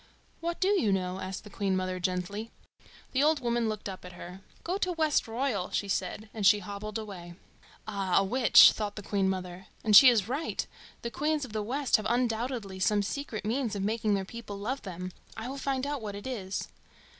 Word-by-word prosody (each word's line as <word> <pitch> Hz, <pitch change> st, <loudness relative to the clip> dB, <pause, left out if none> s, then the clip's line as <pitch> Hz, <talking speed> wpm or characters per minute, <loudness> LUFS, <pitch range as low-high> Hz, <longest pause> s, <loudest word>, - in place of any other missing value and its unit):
"What 340 Hz, 0 st, -3 dB
do 380 Hz, -, +2 dB
you 375 Hz, -, +3 dB
know?" 185 Hz, -1 st, -1 dB
asked 190 Hz, +1 st, -5 dB
the 210 Hz, -, -12 dB
Queen 195 Hz, -2 st, 0 dB
mother 185 Hz, 0 st, -2 dB
gently. 185 Hz, +5 st, -2 dB, 0.6 s
The 265 Hz, -, +1 dB
old 305 Hz, +1 st, +4 dB
woman 235 Hz, -2 st, 0 dB
looked 215 Hz, -1 st, -4 dB
up 190 Hz, -2 st, -7 dB
at 180 Hz, 0 st, -10 dB
her. 180 Hz, +2 st, -10 dB, 0.2 s
"Go 365 Hz, +3 st, -2 dB
to 365 Hz, -2 st, 0 dB
Westroyal," 265 Hz, -, 0 dB
she 200 Hz, -, -1 dB
said; 195 Hz, +2 st, -2 dB
and 215 Hz, -, -4 dB
she 195 Hz, +2 st, +7 dB
hobbled 205 Hz, +1 st, -5 dB
away. 185 Hz, -6 st, -8 dB, 0.5 s
"Ah, 195 Hz, -3 st, 0 dB
a 195 Hz, -, +5 dB
witch!" 240 Hz, +5 st, +7 dB
thought 210 Hz, -1 st, -4 dB
the 210 Hz, -, -7 dB
Queen 195 Hz, -1 st, +1 dB
mother; 185 Hz, 0 st, -5 dB, 0.2 s
"and 215 Hz, -1 st, +4 dB
she 255 Hz, +5 st, +11 dB
is 220 Hz, -5 st, +2 dB
right. 280 Hz, +6 st, -2 dB, 0.4 s
The 235 Hz, -, -3 dB
Queens 300 Hz, +1 st, 0 dB
of 230 Hz, -, -12 dB
the 215 Hz, -, -1 dB
West 260 Hz, +6 st, +1 dB
have 215 Hz, -1 st, -3 dB
undoubtedly 235 Hz, -4 st, -1 dB
some 205 Hz, +1 st, +2 dB
secret 225 Hz, -2 st, -4 dB
means 230 Hz, -1 st, -1 dB
of 195 Hz, -, -2 dB
making 215 Hz, 0 st, +1 dB
their 195 Hz, -1 st, -2 dB
people 220 Hz, -1 st, -8 dB
love 250 Hz, +7 st, -3 dB
them. 185 Hz, -1 st, -6 dB, 0.3 s
I 225 Hz, +2 st, -5 dB
will 275 Hz, +2 st, -5 dB
find 270 Hz, -1 st, -1 dB
out 285 Hz, -2 st, -3 dB
what 205 Hz, -2 st, -5 dB
it 200 Hz, -, -8 dB
is." 200 Hz, -7 st, -4 dB
215 Hz, 205 wpm, -29 LUFS, 195-255 Hz, 0.6 s, she